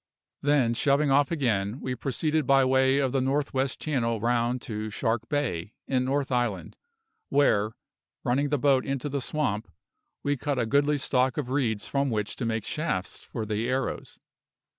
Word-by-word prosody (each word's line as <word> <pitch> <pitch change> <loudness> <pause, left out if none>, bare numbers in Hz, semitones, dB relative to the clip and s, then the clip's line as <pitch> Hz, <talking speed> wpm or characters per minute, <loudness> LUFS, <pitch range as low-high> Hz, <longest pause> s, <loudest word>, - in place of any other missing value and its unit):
Then, 140 -5 +3
shoving 140 +3 +2
off 140 0 +4
again, 115 -7 0
we 130 - -3
proceeded 150 +5 -1
by 135 -1 +5
way 130 +1 +3
of 135 -2 +1
the 135 0 +1
North 140 +2 0
west 135 0 -1
Channel 115 -7 0
round 120 +2 +1
to 110 -1 -4
Shark 115 +1 -1
Bay, 110 - -2
in 130 -1 +1
North 135 +1 0
Island, 120 -7 -1 0.5
where, 110 -7 +3 0.5
running 140 +4 +1
the 145 - +1
boat 135 -1 +3
into 135 +1 -2
the 140 -1 -2
swamp, 120 -7 -1 0.6
we 145 0 +1
cut 145 +1 -2
a 120 - +1
goodly 145 +5 +2
stock 130 -2 +1
of 130 -4 -3
reeds 115 -7 0
from 140 0 0
which 105 -2 -2
to 120 - -2
make 110 -2 -2
shafts 135 - -3
for 110 - -4
the 110 +3 -1
arrows. 130 +1 -2
130 Hz, 170 wpm, -27 LUFS, 115-140 Hz, 0.6 s, by